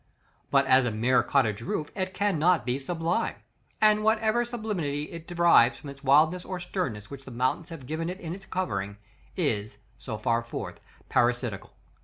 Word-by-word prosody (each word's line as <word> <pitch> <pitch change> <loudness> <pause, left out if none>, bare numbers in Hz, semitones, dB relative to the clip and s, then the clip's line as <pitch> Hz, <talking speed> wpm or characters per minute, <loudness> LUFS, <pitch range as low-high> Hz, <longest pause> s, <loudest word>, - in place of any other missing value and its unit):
But 140 -1 +4
as 130 0 +5
a - - +1
mere 115 +4 +2
cottage 115 -7 +1
roof, 150 +5 -3
it 185 -1 -2
cannot 180 -3 +2
be 125 +2 -1
sublime, 165 +4 -1 0.4
and 215 0 +4
whatever 220 +2 +2
sublimity 210 -12 -3
it 165 -1 -9
derives 170 -8 +5
from 140 -2 -8
the 140 - -20
wildness 155 +6 +4
or 185 -1 -5
sternness 135 - -4
which 140 -1 -8
the - - -9
mountains 130 +7 -1
have 165 -6 -9
given 160 +4 -3
it 185 +2 -6
in 165 -3 -5
its 195 +1 -10
covering, 100 - -3 0.4
is, 110 - -1 0.2
so 110 -4 -5
far 115 +2 +1
forth, 115 0 -6 0.3
parasitical. - - 0
155 Hz, 170 wpm, -27 LUFS, 130-185 Hz, 0.4 s, as